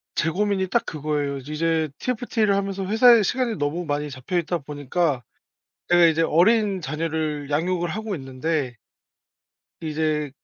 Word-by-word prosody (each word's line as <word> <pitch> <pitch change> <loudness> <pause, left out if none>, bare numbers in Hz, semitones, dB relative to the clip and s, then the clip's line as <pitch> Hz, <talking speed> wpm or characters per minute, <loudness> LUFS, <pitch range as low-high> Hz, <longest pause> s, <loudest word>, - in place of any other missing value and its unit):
제 165 - +1
고민이 195 0 0
딱 235 - 0
그거예요. 145 -2 -2
이제 155 +3 -1
TFT를 225 -4 0
하면서 195 -1 -2
회사에 225 +2 +6
시간이 245 +2 0
너무 150 +4 -2
많이 145 0 -2
잡혀있다 170 +6 -2
보니까 145 0 -2 0.7
제가 175 -1 +6
이제 165 0 +3
어린 195 +3 +3
자녀를 155 -1 -3
양육을 175 +3 0
하고 215 +1 -3
있는데 135 -1 -3 1.1
이제 155 -2 -1
165 Hz, 310 characters per minute, -23 LUFS, 150-195 Hz, 1.1 s, 회사에